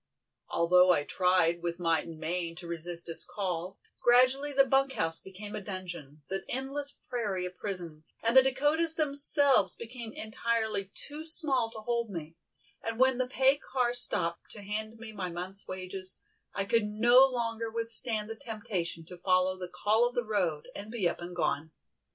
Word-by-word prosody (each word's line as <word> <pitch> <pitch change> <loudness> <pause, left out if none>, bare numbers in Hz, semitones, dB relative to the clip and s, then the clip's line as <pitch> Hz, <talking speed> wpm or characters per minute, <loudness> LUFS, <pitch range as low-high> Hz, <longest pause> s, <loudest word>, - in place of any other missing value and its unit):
Although 180 +2 +4
I 145 -4 +2
tried 175 0 +2
with 170 0 -3
might 165 -3 0
and 165 -1 -9
main 165 +1 -3
to 175 - -9
resist 170 0 -2
its 165 - -4
call, 180 -1 -4 0.2
gradually 255 +4 +4
the 275 -1 +4
bunk 270 0 +2
house 165 -5 -1
became 200 +2 -9
a - - -5
dungeon, 175 -7 -7
the 195 0 -3
endless 275 +2 -2
prairie 205 -7 -2
a 180 - -5
prison, 180 -5 -6 0.2
and 230 +2 +1
the 265 - +10
Dakotas 295 +5 +3
themselves 285 -6 +5
became 235 -1 -7
entirely 220 -2 -2
too 295 +2 -5
small 300 -7 +3
to 225 -1 -10
hold 235 0 -2
me, 165 -4 -7 0.5
and 225 +1 -5
when 260 -1 +4
the 255 - 0
pay 265 +2 +3
car 250 -2 -1
stopped 170 -8 +1
to 205 - -9
hand 215 +2 -4
me 225 -1 -9
my 195 -4 -5
month's 180 +3 -6
wages, 185 0 -4 0.4
I 195 - -1
could 230 +1 +2
no 240 +5 +5
longer 230 -3 -3
withstand 230 -1 +1
the 225 - -6
temptation 210 -8 -4
to 180 +2 -11
follow 185 +1 +2
the 180 -1 -7
"Call 215 +6 +2
of 245 - -15
the 245 - -1
Road" 180 -8 -1
and 205 +2 -7
be 220 -6 0
up 170 - -4
and 175 +1 -7
gone. 160 -2 -2
210 Hz, 175 wpm, -29 LUFS, 180-245 Hz, 0.5 s, the